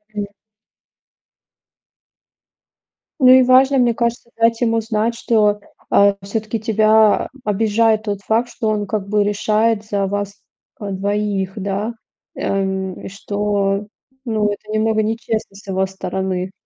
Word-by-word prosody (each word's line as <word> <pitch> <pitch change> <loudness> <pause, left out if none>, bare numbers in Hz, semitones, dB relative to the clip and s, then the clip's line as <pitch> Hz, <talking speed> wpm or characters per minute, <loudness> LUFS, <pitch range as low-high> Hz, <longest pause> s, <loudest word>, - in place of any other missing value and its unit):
М. 205 -1 -2 2.9
Ну 255 - +5
и 260 0 +8
важно, 260 +2 +5
мне 245 -2 +3
кажется, 235 +1 -2
дать 230 +1 +2
ему 230 -1 +2
знать, 225 +1 -1
что, 210 -3 +2 0.3
э, 200 0 +5
все-таки 215 +2 -3
тебя 215 0 +3 0.2
обижает 220 +1 +2
тот 205 -2 -3
факт, 225 +4 0
что 220 - -3
он 210 -2 -1
как 200 -1 -3
бы 210 0 +2
решает 215 +1 +1
за 200 -2 -1
вас, 205 0 -3 0.5
э, 205 - -5
двоих, 200 0 -1
да? 200 +3 -3 0.4
Эм, 190 -1 -2
и - - -7
что 200 0 -1 0.4
ну 215 -3 0
это 210 +1 -8
немного 220 0 +1
нечестно 220 -2 -3
с 200 - -14
его 190 0 0
стороны. 190 -1 -4
210 Hz, 130 wpm, -19 LUFS, 200-225 Hz, 2.9 s, и